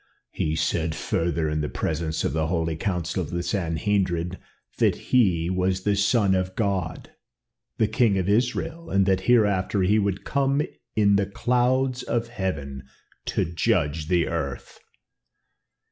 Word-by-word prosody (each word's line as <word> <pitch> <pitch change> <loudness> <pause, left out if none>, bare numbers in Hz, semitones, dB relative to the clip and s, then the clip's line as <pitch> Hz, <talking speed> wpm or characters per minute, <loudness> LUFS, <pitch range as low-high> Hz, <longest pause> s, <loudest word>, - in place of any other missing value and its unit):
"He 80 0 -1
said 80 0 0
further 80 -1 -1
in 75 0 -1
the 75 - -2
presence 80 0 -2
of - - -1
the 80 0 0
holy 80 -1 -1
Council 90 0 -2
of - - -5
the 85 0 -3
Sanhedrim 90 -1 0 0.5
that - - +3
he 90 -10 +2
was 95 +1 0
the 105 -1 +2
Son 100 0 +3
of 95 0 -1
God, 95 -7 -2 0.7
the 110 - +3
King 110 -2 +2
of 95 -1 -1
Israel, 130 +10 0
and 95 0 +3
that 95 -1 +2
hereafter 100 -4 +3
he 105 +4 +3
would 100 -2 -1
come 140 +1 +1 0.3
in 100 -2 +4
the 100 -1 0
clouds 125 +4 +1
of 115 0 -2
heaven 75 - -4 0.5
to - - 0
judge 75 -2 0
the 85 -2 +2
earth." 70 -3 -4
95 Hz, 145 wpm, -25 LUFS, 80-105 Hz, 0.7 s, in